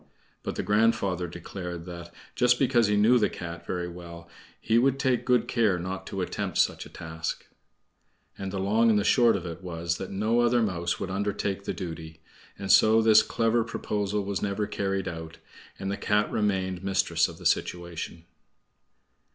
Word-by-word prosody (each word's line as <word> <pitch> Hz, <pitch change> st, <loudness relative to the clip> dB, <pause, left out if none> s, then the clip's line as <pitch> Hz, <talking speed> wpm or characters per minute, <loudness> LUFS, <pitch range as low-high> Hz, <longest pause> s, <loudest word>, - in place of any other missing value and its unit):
But -, -, -4 dB
the -, -, -2 dB
grandfather 105 Hz, -4 st, +1 dB
declared 90 Hz, 0 st, -7 dB
that 85 Hz, -1 st, -8 dB, 0.2 s
just 125 Hz, 0 st, +3 dB
because 120 Hz, -4 st, +3 dB
he 105 Hz, 0 st, +2 dB
knew 115 Hz, +4 st, +5 dB
the 105 Hz, -, +2 dB
Cat 85 Hz, -1 st, -8 dB
very 90 Hz, -1 st, -2 dB
well 85 Hz, -1 st, -10 dB, 0.3 s
he 115 Hz, +1 st, +2 dB
would 135 Hz, +2 st, +2 dB
take 130 Hz, -3 st, +1 dB
good 125 Hz, -2 st, +3 dB
care 110 Hz, -6 st, +2 dB
not 95 Hz, +2 st, -5 dB
to 95 Hz, -, -4 dB
attempt -, -, -3 dB
such -, -, +1 dB
a -, -, -16 dB
task. 80 Hz, 0 st, -5 dB, 0.9 s
And 95 Hz, -1 st, -5 dB
the 100 Hz, -, -4 dB
long 110 Hz, +5 st, +3 dB
and 110 Hz, -, +4 dB
the 105 Hz, -, +2 dB
short 120 Hz, -1 st, +4 dB
of 95 Hz, -3 st, -4 dB
it 85 Hz, +1 st, -6 dB
was 85 Hz, -2 st, -3 dB
that 95 Hz, -, -5 dB
no 110 Hz, +4 st, +1 dB
other 120 Hz, 0 st, +3 dB
mouse 85 Hz, -4 st, -1 dB
would 95 Hz, -1 st, -4 dB
undertake 100 Hz, 0 st, -2 dB
the -, -, -1 dB
duty; 80 Hz, -3 st, -7 dB, 0.4 s
and 95 Hz, -1 st, -1 dB
so 110 Hz, +1 st, +6 dB
this 110 Hz, -1 st, +6 dB
clever 115 Hz, +1 st, +1 dB
proposal 105 Hz, -3 st, -2 dB
was 100 Hz, -1 st, -2 dB
never 105 Hz, +1 st, -1 dB
carried 95 Hz, -2 st, -2 dB
out, 80 Hz, -2 st, -6 dB, 0.4 s
and 95 Hz, 0 st, -3 dB
the 100 Hz, -, -2 dB
Cat 105 Hz, 0 st, +1 dB
remained 95 Hz, -3 st, -1 dB
mistress 95 Hz, 0 st, +2 dB
of -, -, -10 dB
the -, -, -13 dB
situation. 85 Hz, -1 st, -2 dB
95 Hz, 180 wpm, -27 LUFS, 90-110 Hz, 0.9 s, so